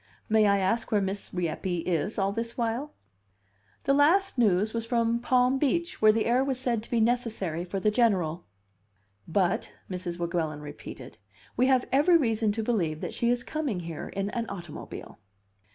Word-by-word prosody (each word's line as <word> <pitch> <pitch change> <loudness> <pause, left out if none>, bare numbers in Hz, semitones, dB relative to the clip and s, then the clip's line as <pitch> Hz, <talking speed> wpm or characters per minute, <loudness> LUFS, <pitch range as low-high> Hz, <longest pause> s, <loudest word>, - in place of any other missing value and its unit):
"May 215 -1 +4
I 200 0 +4
ask 200 +6 0
where 210 - +4
Miss 195 0 -3
Rieppe 175 0 -2
is 180 +5 -1
all 195 -1 +1
this 230 +2 -4
while?" 240 +5 -2 0.9
"The 275 - +2
last 350 +8 +4
news 215 -3 +2
was 230 -1 -2
from 230 0 +1
Palm 250 +2 +2
Beach, 335 +4 0
where 215 0 +7
the 220 +1 0
air 245 +3 +3
was 270 -2 -2
said 240 -4 0
to 225 - -14
be 235 - +1
necessary 220 -8 0
for 190 +2 -4
the 210 +2 +2
General." 185 -8 +1 0.8
"But," 190 +4 0 0.2
Mrs. 180 -1 -4
Weguelin 170 -3 -2
repeated, 145 -1 -10 0.4
"we 255 +2 +3
have 260 -2 +3
every 300 +6 +5
reason 225 -6 +1
to 225 +1 -2
believe 175 -10 0
that - - -4
she 235 - 0
is 240 -1 +1
coming 285 - -3
here 165 -2 -6
in 200 +1 -3
an 230 -1 -3
automobile." 175 -6 -8
220 Hz, 175 wpm, -28 LUFS, 185-245 Hz, 0.9 s, where